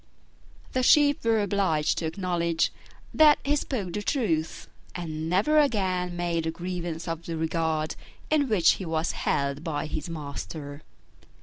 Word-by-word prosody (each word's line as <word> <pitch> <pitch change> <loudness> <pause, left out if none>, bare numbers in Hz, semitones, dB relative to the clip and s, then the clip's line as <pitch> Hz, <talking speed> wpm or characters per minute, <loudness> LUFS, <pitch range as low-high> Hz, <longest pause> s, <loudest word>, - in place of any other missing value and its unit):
The 255 - +1
Sheep 290 +2 +5
were 225 -2 +2
obliged 185 -7 +1
to 165 - -2
acknowledge 170 -1 0 0.4
that 305 -1 +7
he 290 +1 +2
spoke 215 -11 -3
the 210 - -2
truth, 180 - -1 0.3
and 160 -2 -4
never 215 - +3
again 185 -10 +1
made 170 -2 -1
a - - +1
grievance 175 -1 -5
of 165 0 -4
the 165 -1 -3
regard 160 -1 -1 0.4
in 290 -4 +3
which 185 -7 +5
he - - -3
was 160 0 -1
held 140 +1 -1
by 155 -3 -2
his 155 +1 -4
master. 145 -1 -6
170 Hz, 145 wpm, -27 LUFS, 160-205 Hz, 0.4 s, that